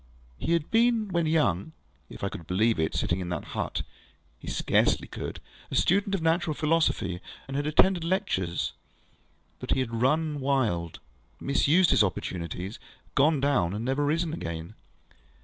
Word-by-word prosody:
He 170 Hz, -, 0 dB
had 165 Hz, -3 st, 0 dB
been, 230 Hz, -2 st, +3 dB
when 170 Hz, -3 st, +1 dB
young 155 Hz, -, +1 dB, 0.4 s
(if -, -, -10 dB
I -, -, 0 dB
could 85 Hz, -, -9 dB
believe 110 Hz, +4 st, +2 dB
it, 80 Hz, -, 0 dB
sitting 85 Hz, -, 0 dB
in 90 Hz, -1 st, -4 dB
that 85 Hz, -4 st, -3 dB
hut, -, -, -2 dB, 0.6 s
ŌĆöhe -, -, -5 dB
scarcely -, -, +2 dB
could), -, -, -6 dB, 0.3 s
a -, -, -4 dB
student 200 Hz, +2 st, +2 dB
of 175 Hz, -, -3 dB
natural 165 Hz, -1 st, +1 dB
philosophy, 155 Hz, -, +1 dB, 0.3 s
and 135 Hz, -, -5 dB
had 145 Hz, +1 st, -1 dB
attended 175 Hz, +3 st, +4 dB
lectures; 95 Hz, -, -1 dB, 0.9 s
but -, -, -1 dB
he -, -, 0 dB
had 120 Hz, -3 st, -2 dB
run 150 Hz, +3 st, +1 dB
wild, 115 Hz, -, 0 dB, 0.4 s
misused 160 Hz, +6 st, +3 dB
his -, -, +5 dB
opportunities, 90 Hz, +1 st, -4 dB, 0.3 s
gone 145 Hz, +2 st, +4 dB
down, 130 Hz, -11 st, +1 dB
and 110 Hz, +3 st, -3 dB
never 135 Hz, +3 st, 0 dB
risen 160 Hz, +2 st, 0 dB
again. 85 Hz, -, -5 dB
140 Hz, 155 wpm, -27 LUFS, -, 0.9 s, his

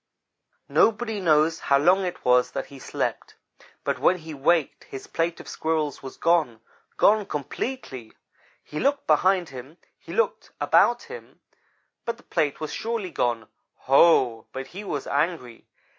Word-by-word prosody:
"Nobody 225 Hz, -1 st, +2 dB
knows 160 Hz, -2 st, +3 dB
how 140 Hz, -, +3 dB
long 180 Hz, +6 st, +3 dB
it 180 Hz, -, -6 dB
was 125 Hz, 0 st, +3 dB
that -, -, -3 dB
he 135 Hz, -, -10 dB
slept, -, -, -4 dB, 0.5 s
but -, -, -1 dB
when 185 Hz, -, +3 dB
he 160 Hz, -2 st, -9 dB
waked 150 Hz, +2 st, +1 dB
his 135 Hz, -, -9 dB
plate 165 Hz, 0 st, -2 dB
of -, -, -11 dB
Squirrels 155 Hz, -3 st, -2 dB
was 135 Hz, -, -9 dB
gone 160 Hz, -10 st, +2 dB, 0.4 s
gone 215 Hz, +1 st, +4 dB
completely. 145 Hz, -, -5 dB, 0.5 s
He 150 Hz, -, -6 dB
looked 280 Hz, 0 st, +1 dB
behind 180 Hz, +3 st, +3 dB
him; 135 Hz, +5 st, -10 dB, 0.2 s
he -, -, -12 dB
looked 470 Hz, -, -1 dB
about 240 Hz, 0 st, +3 dB
him; 475 Hz, +1 st, -12 dB, 0.6 s
but 235 Hz, 0 st, -3 dB
the -, -, -20 dB
plate 145 Hz, -2 st, -1 dB
was 155 Hz, -, -5 dB
surely 225 Hz, -5 st, -3 dB
gone. 115 Hz, -3 st, -1 dB, 0.3 s
Ho! 130 Hz, -5 st, +4 dB
But 130 Hz, 0 st, -6 dB
he 200 Hz, +3 st, -7 dB
was 145 Hz, -8 st, -4 dB
angry. 140 Hz, -5 st, -2 dB
160 Hz, 150 wpm, -25 LUFS, 135-190 Hz, 0.6 s, gone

